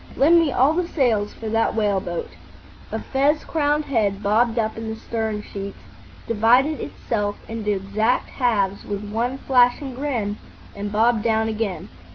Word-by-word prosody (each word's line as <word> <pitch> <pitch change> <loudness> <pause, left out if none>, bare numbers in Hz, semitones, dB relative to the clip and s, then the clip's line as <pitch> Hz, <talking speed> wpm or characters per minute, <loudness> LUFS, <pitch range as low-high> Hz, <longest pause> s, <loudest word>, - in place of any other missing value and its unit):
lend 320 +6 +6
me 320 -4 +2
all 265 +5 +3
the 350 +1 0
sails 230 -10 +1
for 225 - -8
that 225 +1 +1
whale 205 -3 +2
boat." 175 -3 -4 0.6
A - - -1
fez 285 +3 +1
crowned 300 -1 0
head 210 -6 0
bobbed 225 +3 +2
up 220 -1 0
in 225 0 -5
the 220 - -4
stern 220 -2 -3
sheets, 200 -1 -7 0.5
divided 245 +7 +3
itself 205 -3 -3
into 220 -2 -2
exact 205 +5 0
halves 200 -6 0
with 205 0 -5
one 235 +5 -1
flashing 255 +1 +2
grin, 240 -6 -2 0.4
and 205 0 -4
bobbed 225 +1 +3
down 220 0 +1
again. 215 -4 -3
225 Hz, 160 wpm, -22 LUFS, 210-255 Hz, 0.6 s, lend